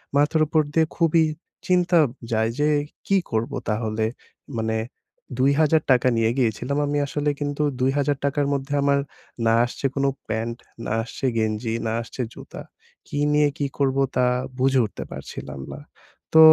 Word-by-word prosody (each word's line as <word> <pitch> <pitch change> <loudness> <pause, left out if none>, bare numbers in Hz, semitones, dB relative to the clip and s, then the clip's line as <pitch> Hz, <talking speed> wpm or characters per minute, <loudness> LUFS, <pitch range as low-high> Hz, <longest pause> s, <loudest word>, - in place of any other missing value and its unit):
মাথার 150 +2 +3
উপর 155 +1 +3
দিয়ে 160 -1 +4
খুবই 165 -1 +4 0.4
চিন্তা 180 -1 +3 0.4
যায় 110 0 +2
যে 150 - +3 0.4
কি 195 - +4
করবো 115 +5 -1
তাহলে। 110 0 -1 0.5
মানে 110 0 0 0.6
৳২০০০ 140 -1 +3
নিয়ে 115 0 +3
গিয়েছিলাম 125 +3 0
আমি 145 - 0
আসলে 150 +1 -1
কিন্তু 145 0 -1 0.2
৳২০০০ 140 +2 +1
র - - -1
মধ্যে 140 +1 -3
আমার 140 0 +3 0.5
না 115 - +4
আসছে 120 - -6
কোনো 140 0 +2 0.2
প্যান্ট, 115 +1 -2 0.3
না - - -3
আসছে 125 - -6
গেঞ্জি, 110 +1 0
না 110 - 0
আসছে 120 +2 -6
জুতা। - - -10 0.5
কী - - -5 0.2
নিয়ে 150 0 +4
কি 145 - 0
করবো 135 -1 +2
তা 125 - +3 0.4
বুঝে 135 0 +3
উঠতে 105 - -6
পারছিলাম 70 - -7
না। - - -7 0.6
তো - - +9
135 Hz, 150 wpm, -24 LUFS, 115-145 Hz, 0.6 s, তো